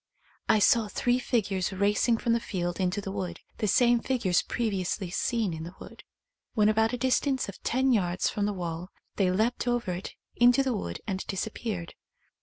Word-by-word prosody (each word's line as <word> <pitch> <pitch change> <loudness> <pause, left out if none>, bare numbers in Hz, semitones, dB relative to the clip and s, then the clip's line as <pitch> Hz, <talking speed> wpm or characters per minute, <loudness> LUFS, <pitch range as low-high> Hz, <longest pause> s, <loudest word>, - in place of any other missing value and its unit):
I - - +6
saw 215 +2 +4
three 245 +5 +1
figures 200 -7 0
racing 205 +4 +2
from 230 +1 +1
the 235 - +2
field 175 -5 -3
into 190 +2 0
the 195 - -5
wood 185 -4 -4
— - - -35
the 215 - 0
same 240 +3 +4
figures 230 -8 +1
previously 195 -4 -2
seen 220 -1 0
in 160 - -6
the 170 +3 -8
wood. - - -12 0.5
When 210 -1 +4
about 220 +1 +2
a - - 0
distance 260 +1 +1
of 200 - -9
ten 260 +1 +2
yards 180 -4 +1
from 205 -1 0
the - - 0
wall 175 -1 -5 0.3
they 195 -3 +3
leapt 225 +6 0
over 240 -5 0
it 180 +2 -6 0.2
into 245 +3 +5
the 260 -2 0
wood 85 - -4
and 190 -2 -3
disappeared. 195 -3 -4
205 Hz, 190 wpm, -28 LUFS, 185-235 Hz, 0.5 s, I